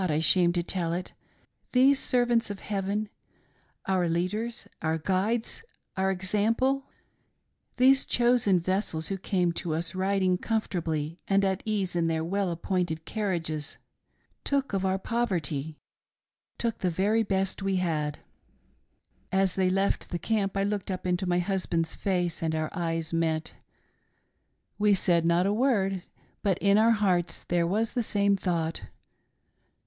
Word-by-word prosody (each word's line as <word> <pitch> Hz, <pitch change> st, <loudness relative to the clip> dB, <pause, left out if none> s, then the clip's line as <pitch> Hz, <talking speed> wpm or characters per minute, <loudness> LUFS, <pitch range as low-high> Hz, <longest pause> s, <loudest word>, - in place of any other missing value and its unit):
I 150 Hz, 0 st, +1 dB
shame 175 Hz, +2 st, +4 dB
to 175 Hz, -1 st, 0 dB
tell 170 Hz, -2 st, -2 dB
it; 180 Hz, +1 st, -4 dB, 0.6 s
these 265 Hz, +2 st, +5 dB
servants 240 Hz, -3 st, +2 dB
of 205 Hz, -1 st, -5 dB
Heaven 205 Hz, +1 st, -2 dB, 0.4 s
— -, -, -40 dB
our 185 Hz, -3 st, +1 dB
leaders, 210 Hz, +8 st, -2 dB
our 160 Hz, 0 st, 0 dB
guides, 200 Hz, -, -1 dB, 0.3 s
our 190 Hz, 0 st, +1 dB
example 220 Hz, +8 st, +1 dB, 0.4 s
— -, -, -47 dB
these 265 Hz, +2 st, +5 dB
chosen 240 Hz, -6 st, +3 dB
vessels 175 Hz, -2 st, -1 dB
who 195 Hz, -, -2 dB
came 180 Hz, -2 st, +1 dB
to 170 Hz, -1 st, -3 dB
us, 165 Hz, +3 st, -2 dB
riding 185 Hz, -1 st, +1 dB
comfortably 165 Hz, -7 st, -2 dB
and 195 Hz, 0 st, +3 dB
at 190 Hz, 0 st, 0 dB
ease 195 Hz, -4 st, -1 dB
in 170 Hz, -1 st, +1 dB
their 160 Hz, -1 st, 0 dB
well 195 Hz, +3 st, -1 dB
appointed 170 Hz, -1 st, -2 dB
car 215 Hz, -1 st, -3 dB
riages, 160 Hz, -5 st, -3 dB, 0.7 s
took 275 Hz, -4 st, 0 dB
of 195 Hz, -1 st, 0 dB
our 190 Hz, 0 st, +1 dB
poverty 165 Hz, -, -2 dB, 0.4 s
— -, -, -61 dB
took 230 Hz, -2 st, -1 dB
the 185 Hz, -, +1 dB
very 200 Hz, +6 st, +2 dB
best 195 Hz, -2 st, -1 dB
we 195 Hz, 0 st, 0 dB
had! 155 Hz, -5 st, -1 dB, 1.1 s
"As 190 Hz, -1 st, +2 dB
they 185 Hz, -1 st, +2 dB
left 195 Hz, +2 st, 0 dB
the 175 Hz, -, -2 dB
camp, 200 Hz, 0 st, -1 dB
I 195 Hz, -, +2 dB
looked 205 Hz, -1 st, -2 dB
up 185 Hz, -1 st, -4 dB
into 180 Hz, +1 st, 0 dB
my 175 Hz, -, +2 dB
husband's 175 Hz, -3 st, -1 dB
face 180 Hz, -4 st, -1 dB
and 160 Hz, -1 st, 0 dB
our 155 Hz, 0 st, -2 dB
eyes 165 Hz, -2 st, -2 dB
met. 160 Hz, -1 st, 0 dB, 1.3 s
We 205 Hz, -1 st, +4 dB
said 170 Hz, -3 st, +2 dB
not 170 Hz, +2 st, +3 dB
a 200 Hz, -, +2 dB
word, 200 Hz, -6 st, +1 dB, 0.4 s
but 195 Hz, -4 st, +1 dB
in 200 Hz, +1 st, +4 dB
our 225 Hz, +1 st, +5 dB
hearts 185 Hz, -5 st, 0 dB
there 170 Hz, -1 st, +2 dB
was 215 Hz, +5 st, 0 dB
the 245 Hz, -, +1 dB
same 200 Hz, -2 st, +2 dB
thought. 170 Hz, -4 st, -1 dB
190 Hz, 155 wpm, -28 LUFS, 170-205 Hz, 1.3 s, these